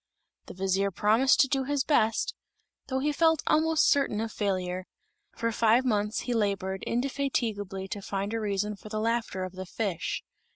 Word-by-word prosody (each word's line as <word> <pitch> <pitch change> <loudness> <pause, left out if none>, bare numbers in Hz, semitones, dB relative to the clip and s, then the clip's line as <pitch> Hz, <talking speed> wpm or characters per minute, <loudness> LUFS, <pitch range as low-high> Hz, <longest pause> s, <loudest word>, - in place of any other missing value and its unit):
The - - -9
vizier 195 +1 +1
promised 220 +7 +4
to 270 - +4
do 270 0 0
his 285 -1 0
best, 295 - +2 0.5
though 260 - -1
he 290 +3 +1
felt 320 0 +3
almost 315 0 +3
certain 275 -7 +2
of 225 0 -2
failure. 185 -3 -2 0.5
For 230 0 0
five 230 +3 +3
months 210 -2 0
he 245 - -2
labored 195 -3 -1
indefatigably 230 -7 -1
to 205 - -4
find 200 +2 -3
a 225 - 0
reason 210 0 -1
for 215 - -12
the 215 0 -2
laughter 230 -4 -1
of 185 0 -5
the 185 0 -7
fish. 195 -4 -3
215 Hz, 170 wpm, -28 LUFS, 195-260 Hz, 0.5 s, promised